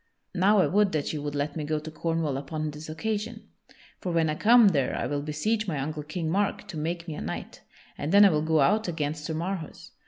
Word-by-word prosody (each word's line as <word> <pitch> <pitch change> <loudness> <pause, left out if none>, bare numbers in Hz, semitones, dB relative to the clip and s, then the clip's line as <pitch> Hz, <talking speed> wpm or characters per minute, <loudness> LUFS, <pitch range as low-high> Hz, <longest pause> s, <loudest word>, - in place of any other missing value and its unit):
Now 195 +3 +4
I 185 - +5
would 205 -1 +2
that 155 -1 -1
you 150 - -3
would 145 0 -4
let 145 0 -2
me 155 - -3
go 155 +1 -1
to 155 +1 -6
Cornwall 165 -2 -1
upon 155 +2 -3
this 150 +2 -9
occasion. 220 +7 -4 0.5
For 180 - -3
when 165 -2 +2
I - - 0
come 225 +5 +6
there 140 -8 0
I - - -2
will 145 -1 -2
beseech 205 +9 -1
my 160 -5 -1
uncle 150 +2 -3
King 160 +3 -4
Mark 195 +5 0
to - - -6
make 170 +3 -3
me 160 - -4
a - - -6
knight, - - -6 0.4
and 145 - -2
then 205 +1 +8
I - - +7
will 150 -1 +1
go 160 -1 +2
out 210 +10 +3
against 150 -2 -3
Sir 160 - -3
Marhaus. 170 0 -5
160 Hz, 240 wpm, -27 LUFS, 150-190 Hz, 0.5 s, then